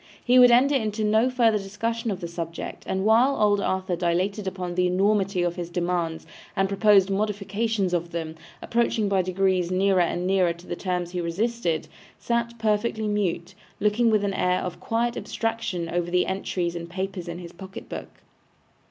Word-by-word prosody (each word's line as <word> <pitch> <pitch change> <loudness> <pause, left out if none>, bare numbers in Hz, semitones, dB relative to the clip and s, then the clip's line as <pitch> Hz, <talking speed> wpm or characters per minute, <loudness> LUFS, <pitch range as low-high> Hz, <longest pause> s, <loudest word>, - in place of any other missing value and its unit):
He 250 +1 +6
would 250 0 +9
enter 255 +4 +5
into 220 -4 0
no 220 +4 +3
further 230 -4 +3
discussion 230 +4 -3
of 195 -2 -3
the 170 - -3
subject, 170 0 -6
and 190 +1 -1
while 240 +6 +4
old 205 -1 +3
Arthur 190 -1 -1
dilated 185 +4 -1
upon 185 -2 -4
the 180 0 +2
enormity 195 0 +1
of 175 0 -1
his 175 -1 -4
demands 175 -2 -2 0.3
and 195 0 +2
proposed 200 -1 +4
modifications 205 0 -1
of 170 -1 -1
them, 160 -2 -4 0.3
approaching 230 -2 +1
by 195 -1 +2
degrees 185 -1 +1
nearer 190 0 +3
and 175 +1 0
nearer 185 -2 +2
to 170 +1 -16
the - - -4
terms 180 -1 -2
he 180 -1 -2
resisted, 175 -1 -1 0.3
sat 235 0 -2
perfectly 220 0 0
mute, 195 -3 -1 0.3
looking 215 +3 +2
with 215 -2 +2
an 200 -1 0
air 180 -1 +1
of 180 -1 -5
quiet 235 +1 -1
abstraction 225 -7 -3
over 175 0 -2
the 180 0 +2
entries 180 -2 -2
and 170 0 -6
papers 185 0 -4
in 170 0 -5
his 175 -1 -9
pocket 190 +1 -10
book. - - -7
195 Hz, 180 wpm, -25 LUFS, 175-215 Hz, 0.3 s, would